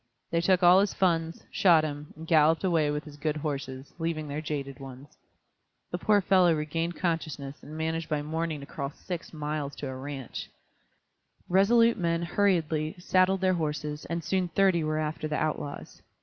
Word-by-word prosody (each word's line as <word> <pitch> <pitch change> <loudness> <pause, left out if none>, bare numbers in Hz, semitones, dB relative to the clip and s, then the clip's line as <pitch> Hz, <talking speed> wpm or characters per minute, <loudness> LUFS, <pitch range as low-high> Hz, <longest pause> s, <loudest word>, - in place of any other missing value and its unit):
They 170 - +2
took 185 +1 +3
all 180 +2 +8
his 200 +1 +1
funds, 165 -3 0
shot 170 -5 +5
him, 145 -1 -5
and 160 +1 -9
galloped 160 0 +4
away 165 -5 +2
with 150 +1 -2
his 145 -1 -12
good 155 +1 -1
horses, 140 -3 -5
leaving 165 -2 -2
their 145 +2 -4
jaded 145 -3 -4
ones. 135 +1 -11 0.8
The 175 - -3
poor 205 +2 +3
fellow 185 -3 +4
regained 165 +3 -2
consciousness, 155 -5 -3
and 155 +1 -9
managed 160 0 -2
by 150 -2 -1
morning 160 0 -3
to - - -8
crawl 140 -1 -4
six 170 +3 -7
miles 150 -2 -4
to 145 - -5
a 130 - -5
ranch. 135 -1 -6 1.0
Resolute 230 +5 +4
men 170 -1 0
hurriedly 165 -4 +1
saddled 185 +1 +2
their 185 -1 +3
horses, 150 -2 -3
and 170 0 -3
soon 185 +1 0
thirty 175 -1 +2
were 155 0 -1
after 155 0 -2
the 150 - -2
outlaws. 150 -2 -4
160 Hz, 175 wpm, -28 LUFS, 150-175 Hz, 1.0 s, all